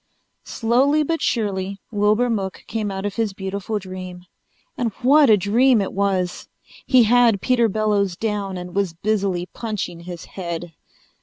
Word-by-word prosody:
Slowly 265 +6 +2
but 330 +2 -2
surely 200 -3 -1
Wilbur 210 +3 +2
Mook 195 -5 -3
came 215 -2 -3
out 195 0 -4
of 205 +1 -4
his 220 -3 0
beautiful 195 +2 -4
dream. 185 -2 -8 0.5
And 240 -4 -1
what 285 +1 +6
a 215 - +7
dream 230 +6 +3
it 195 - -2
was! 190 -2 -1 0.4
He 255 -3 +6
had 230 -2 +4
Peter 235 +1 +2
Bellows 205 -3 0
down 205 -4 -2
and 180 0 -7
was 195 -3 0
busily 195 -1 -1
punching 210 -7 -4
his 170 0 -8
head. 170 -2 -6
205 Hz, 150 wpm, -21 LUFS, 190-230 Hz, 0.5 s, a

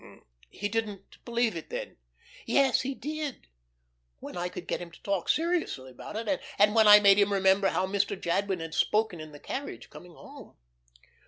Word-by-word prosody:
"He 205 - -4
didn't 205 -2 -5
believe 235 -4 0
it, 165 - -7
then." - - -6 0.5
"Yes 265 +2 +3
he 265 +1 -4
did 300 -1 -5 0.7
when - - -9
I 175 0 -2
could 180 - -8
get - - -3
him 175 - -7
to 170 - -17
talk 195 -3 -2
seriously 325 - -1
about 205 +11 -10
it, 230 +6 -2 0.2
and 210 +1 +4
when 220 -1 +5
I 210 0 +10
made 200 -1 +6
him 205 0 +3
remember 195 0 +3
how 180 +3 0
Mr. 200 0 -1
Jadwin 190 +1 -1
had 165 -1 -6
spoken 215 -5 +1
in 155 0 -9
the 145 - -12
carriage 280 - -6
coming 180 -1 -13
home." - - -13
200 Hz, 180 wpm, -28 LUFS, 180-230 Hz, 0.7 s, I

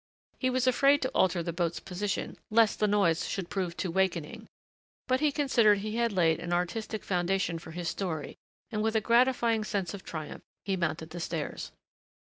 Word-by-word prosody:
He 255 - +1
was 255 0 +1
afraid 275 +3 +4
to 260 - 0
alter 180 -2 +2
the 170 - -3
boat's 170 -1 -1
position 195 +2 -3
lest 220 -1 +4
the 210 - +3
noise 195 -6 +2
should 190 -3 -4
prove 180 -3 -2
too 185 - -2
wakening, 175 -4 -1 0.6
but 255 0 +2
he 300 -1 +2
considered 240 -8 +4
he 215 +3 -4
had 235 -1 +2
laid 165 -4 +2
an 175 - -5
artistic 195 +5 -2
foundation 180 -2 0
for 165 - -11
his 170 +1 -3
story 160 -4 -4 0.4
and 215 -2 -1
with 220 +1 0
a - - +5
gratifying 235 -1 +3
sense 195 -5 -2
of 200 - -8
triumph 155 -2 -6 0.2
he 195 -1 0
mounted 160 -2 -2
the 175 - -6
stairs. - - -4
195 Hz, 185 wpm, -29 LUFS, 170-225 Hz, 0.6 s, a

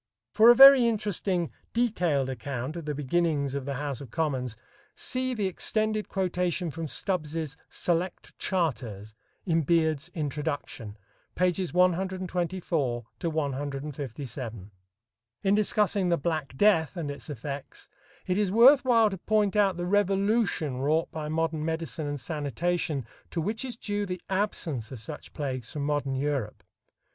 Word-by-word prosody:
For 225 +2 +7
a 240 - +9
very 270 -2 +10
interesting 200 -5 0 0.2
detailed 180 - +1
account 130 +2 -4
of 170 -3 -6
the 150 -1 -2
beginnings 150 -1 0
of 140 -2 -3
the 140 -1 -3
House 140 -1 -3
of 135 - -9
Commons, 130 -6 -2 0.4
see 255 0 -1
the 210 -3 -1
extended 215 +3 0
quotation 180 -2 -1
from 165 +2 -5
Stubbs's 155 -3 -2
"Select 175 +1 -2
Charters" 120 - -2 0.3
in 165 -3 +2
Beard's 160 0 +1
"Introduction," 145 -8 -4 0.4
pp. 180 0 +1
124 180 - 0 0.2
157. 140 - -4 0.7
In 195 - +3
discussing 205 -3 +2
the 170 - +3
"black 150 -4 -2
death" 185 -3 +3
and 150 -4 -3
its 140 - -8
effects, 140 +1 -6 0.4
it 185 +2 0
is 205 -3 +1
worth 260 +6 +7
while 230 -4 +4
to 195 - -5
point 210 -1 +1
out 195 -4 +3
the 175 - -2
revolution 200 - +1
wrought 155 +4 +1
by 155 -1 -5
modern 160 -1 -1
medicine 160 -1 -3
and 145 0 -3
sanitation 155 0 -2 0.2
to 170 - -3
which 215 +8 -2
is 250 -3 -6
due 205 -2 -2
the 180 -1 -4
absence 165 - -1
of 130 - -7
such 145 +7 -8
plagues 130 -5 -4
from 145 -2 -3
modern 145 -2 0
Europe. 135 -5 -2
165 Hz, 140 wpm, -28 LUFS, 140-190 Hz, 0.7 s, very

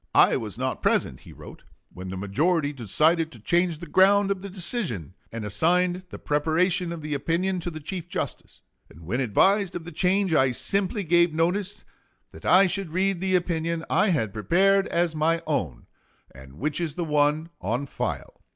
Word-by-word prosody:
"I - - +6
was - - -5
not - - -3
present," 65 - 0
he - - -14
wrote, - - -12 0.3
"when 90 +1 -8
the 95 - -5
majority 145 - 0
decided 155 - +1
to 120 - -13
change 175 - +1
the 170 - -9
ground 195 +4 +4
of 195 -2 -2
the 200 - -7
decision, 175 - -1 0.2
and 115 -2 -5
assigned 175 - +1
the - - -8
preparation 170 +4 0
of 165 -2 -7
the 150 0 -3
opinion 175 +6 -1
to 175 - -4
the 155 -2 -8
Chief 175 +3 -6
Justice; 180 -7 -6 0.3
and 80 - -16
when 105 +11 -2
advised 190 - +2
of 175 - -5
the 175 - -9
change 190 0 +1
I 130 -4 +3
simply 195 - -1
gave 170 -1 +3
notice 180 +5 -1 0.5
that - - -13
I 190 +2 +6
should 190 -1 -2
read 185 +2 0
the 190 -1 +1
opinion 170 -2 -1
I - - +3
had 110 - 0
prepared 190 - +2
as 170 -1 0
my 165 +2 +1
own, 85 - -2 0.5
and 65 +1 -14
which 145 - -3
is 160 -4 -3
the 175 - -2
one 150 +1 +1
on 120 +9 -2
file." - - -5
165 Hz, 185 wpm, -25 LUFS, 145-185 Hz, 0.5 s, I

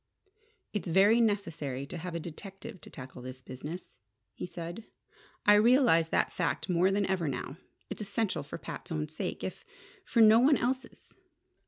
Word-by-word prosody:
"It's 205 -2 -2
very 200 +7 +5
necessary 165 - -1
to 160 - -7
have 175 0 -5
a - - -1
detective 195 +5 -8
to - - -11
tackle 130 -1 -10
this 130 +1 -8
business," 145 +4 -8 0.3
he - - -6
said. 175 +4 -7 0.6
"I 210 - +8
realize 210 - +5
that - - +1
fact 170 - -1
more 180 +1 +3
than 200 +1 +1
ever 185 -4 0
now. 135 +2 -4 0.3
It's - - -6
essential 200 -5 -1
for 145 - -7
Pat's - - -8
own 155 -1 -2
sake, 155 - -4
if - - -5 0.4
for 235 - -1
no 220 0 +8
one 275 +3 +5
else's. 255 +2 -3
180 Hz, 165 wpm, -30 LUFS, 155-210 Hz, 0.6 s, I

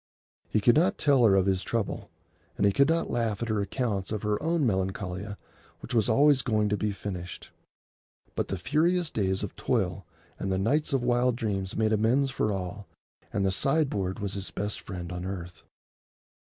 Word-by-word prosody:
He 110 - +1
could 120 +3 +5
not 185 +6 +3
tell 140 -4 +4
her 100 -3 +6
of 95 -1 +3
his 95 -1 +1
trouble, 115 -1 -3 0.5
and - - +2
he 100 - +5
could 140 +8 +3
not 165 0 +1
laugh 115 -2 -1
at 115 - -4
her 110 -2 +1
accounts 100 -2 -2
of 110 -1 -3
her 105 0 0
own 165 -1 +1
Melancolia 95 0 -2 0.4
which - - -8
was 115 -4 +2
always 140 +3 +5
going 105 -3 +1
to 105 - +1
be 105 0 -1
finished. 90 -3 -7 0.8
But - - -2
the 95 - -3
furious 165 - +1
days 95 -3 0
of - - -5
toil - - -1 0.3
and 95 - -2
the 95 - +1
nights 145 +12 +1
of 135 -3 +1
wild 125 0 +2
dreams 100 -5 -2
made 110 0 +2
amends 125 +6 +2
for 110 -5 0
all, 95 +1 -5 0.4
and 100 - 0
the 95 - +2
sideboard 105 - +1
was 100 -1 -3
his 100 -1 -4
best 105 +1 -4
friend 90 -2 -6
on 90 0 -5
earth. 90 -2 -6
105 Hz, 190 wpm, -28 LUFS, 95-125 Hz, 0.8 s, her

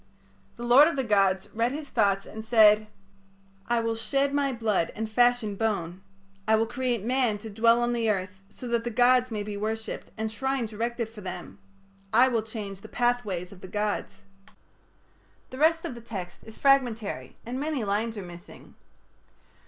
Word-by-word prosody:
The 240 - -8
lord 250 +5 +7
of 335 - -1
the 265 - 0
gods 195 -4 +2
read 230 +2 +1
his 290 +1 -6
thoughts 200 -4 +2
and 220 - -8
said: 215 -2 +5 0.8
"I 235 -1 +2
will 230 0 -1
shed 275 +5 0
my 285 -1 +1
blood 215 -8 0
and 220 +1 -3
fashion 240 -1 +2
bone... 190 -5 -2 0.5
I 220 - +5
will 220 +1 +2
create 245 -2 -2
man 245 -3 +1
to 215 +1 -9
dwell 230 +3 +4
on 240 0 0
the 230 -2 0
earth 190 -1 -2
so 250 - -9
that 235 -1 0
the 240 - -2
gods 250 +2 +4
may 215 -3 -3
be 205 0 -5
worshipped 220 +2 -4
and 220 0 -2
shrines 255 -1 -2
erected 235 +1 -2
for 220 -1 -12
them. 185 +1 -7 0.5
I 255 +1 +6
will 230 -3 +1
change 210 -3 -7
the - - -10
pathways 215 -8 -1
of 195 -2 -14
the - - -8
gods...." 210 +2 -3 1.3
The 260 - -8
rest 325 +2 +3
of - - -4
the 235 - -10
text 195 -6 -7
is 220 - -11
fragmentary, 230 - +1
and 250 +3 -4
many 295 -4 -2
lines 215 +2 -1
are 200 - -5
missing. 175 +2 -12
225 Hz, 180 wpm, -27 LUFS, 205-245 Hz, 1.3 s, lord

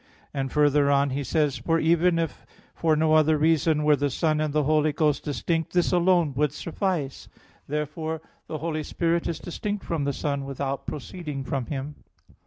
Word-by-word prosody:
And 135 -1 -2
further 145 -1 +3
on 140 0 +3
he 140 +2 -2
says: 145 -1 0
"For 165 +7 +1
even 170 +2 +3
if 165 -1 -3 0.3
for 160 -2 +2
no 155 0 +2
other 155 0 +5
reason 155 0 +2
were 150 0 +5
the 145 +1 0
Son 155 +3 0
and 155 -1 0
the 150 +1 +1
Holy 155 +1 +3
Ghost 150 -1 +1
distinct, 160 +2 -2
this 175 -1 +2
alone 175 -4 +3
would 150 -1 +1
suffice." 165 -4 -3 0.4
Therefore 155 +2 -3 0.3
the 155 - -4
Holy 155 0 -2
Spirit 170 +2 0
is 165 - -2
distinct 205 +4 -4
from 160 -4 -1
the 140 - +1
Son, 140 0 -2
without 135 0 -4
proceeding 150 -1 -5
from 130 -2 -3
Him. 140 +1 -5
150 Hz, 180 wpm, -26 LUFS, 140-165 Hz, 0.4 s, other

